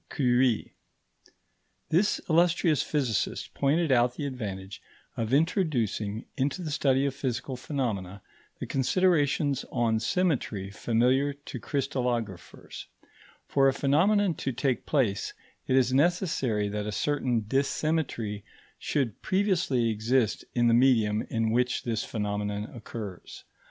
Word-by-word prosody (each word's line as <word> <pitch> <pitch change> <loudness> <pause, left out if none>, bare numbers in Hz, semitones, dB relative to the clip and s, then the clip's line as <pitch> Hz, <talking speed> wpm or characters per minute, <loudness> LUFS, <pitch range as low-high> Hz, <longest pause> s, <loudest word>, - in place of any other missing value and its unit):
Curie. 125 -3 +1 1.2
This 190 +6 +2
illustrious 170 -3 +3
physicist 135 -9 -1
pointed 150 +3 +1
out 120 -1 +3
the 145 - -4
advantage 100 -7 -6 0.3
of 115 0 -3
introducing 130 - 0
into 145 +6 -1
the 155 - -4
study 135 -2 +2
of 140 - -1
physical 130 -1 -3
phenomena 105 -9 -3 0.4
the - - -4
considerations 145 -1 +1
on 115 -2 +1
symmetry 120 - -1
familiar 125 +7 +1
to 140 +1 -9
crystallographers; 125 - -3 0.6
for 135 -1 +3
a 135 - +3
phenomenon 180 +8 +3
to 135 - -3
take 130 +1 -1
place, 120 -10 0 0.3
it 130 - +2
is 130 -1 +3
necessary 140 - +1
that 105 0 -3
a - - -2
certain 125 0 0
dissymmetry 135 -3 -1 0.4
should 130 -8 -2
previously 180 - +1
exist 110 +1 +1
in 120 -1 +3
the 115 - +4
medium 115 -4 +4
in 115 -1 0
which 125 +2 +1
this 115 -3 -1
phenomenon 105 -1 -3
occurs. 105 -5 -8
130 Hz, 120 wpm, -28 LUFS, 110-145 Hz, 1.2 s, the